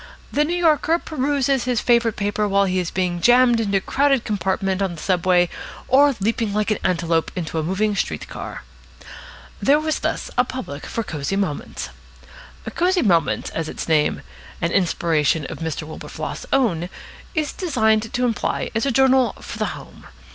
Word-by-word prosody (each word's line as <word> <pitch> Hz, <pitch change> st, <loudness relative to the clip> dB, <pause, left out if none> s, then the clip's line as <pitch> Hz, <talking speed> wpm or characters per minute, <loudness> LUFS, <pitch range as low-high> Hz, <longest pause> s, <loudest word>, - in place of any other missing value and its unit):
The 295 Hz, -, +2 dB
New 335 Hz, +4 st, -1 dB
Yorker 330 Hz, -1 st, +3 dB
peruses 275 Hz, -4 st, 0 dB
his 250 Hz, -3 st, +1 dB
favourite 235 Hz, -2 st, +2 dB
paper 205 Hz, +1 st, -1 dB
while 200 Hz, 0 st, +3 dB
he 185 Hz, -1 st, 0 dB
is 175 Hz, -2 st, -2 dB
being 180 Hz, -2 st, -1 dB
jammed 245 Hz, +2 st, +5 dB
into 200 Hz, -3 st, +1 dB
a -, -, -1 dB
crowded 275 Hz, +2 st, +1 dB
compartment 195 Hz, -1 st, -1 dB
on 190 Hz, -3 st, -1 dB
the -, -, -10 dB
subway 180 Hz, -1 st, +3 dB, 0.4 s
or 280 Hz, +1 st, +5 dB
leaping 215 Hz, 0 st, -1 dB
like 215 Hz, +1 st, +1 dB
an 215 Hz, -, 0 dB
antelope 170 Hz, -2 st, +1 dB
into 165 Hz, -2 st, -3 dB
a -, -, -1 dB
moving 200 Hz, +5 st, 0 dB
Street -, -, -2 dB
car. -, -, -7 dB, 1.0 s
There 290 Hz, +2 st, +4 dB
was 310 Hz, 0 st, -1 dB
thus -, -, -3 dB
a -, -, +6 dB
public 245 Hz, -, -6 dB
for 230 Hz, -, -3 dB
Cosy 150 Hz, 0 st, -3 dB
Moments. 190 Hz, -7 st, -3 dB, 0.8 s
Cosy 360 Hz, +1 st, +2 dB
Moments, 170 Hz, -7 st, +1 dB
as 160 Hz, -1 st, -3 dB
its -, -, -6 dB
name 155 Hz, -2 st, +2 dB, 0.4 s
(an 170 Hz, -, 0 dB
inspiration 165 Hz, -4 st, +1 dB
of -, -, -7 dB
Mr. 160 Hz, -1 st, -3 dB
Wilberfloss's 155 Hz, +1 st, -7 dB
own) 185 Hz, -11 st, +1 dB, 0.5 s
is 310 Hz, -2 st, -1 dB
designed 220 Hz, -, +1 dB
to 250 Hz, 0 st, 0 dB
imply, 230 Hz, -3 st, -1 dB
is 225 Hz, +5 st, 0 dB
a -, -, +2 dB
journal 265 Hz, 0 st, +4 dB
for -, -, -8 dB
the -, -, +1 dB
home. -, -, -14 dB
210 Hz, 170 wpm, -21 LUFS, 175-260 Hz, 1.0 s, a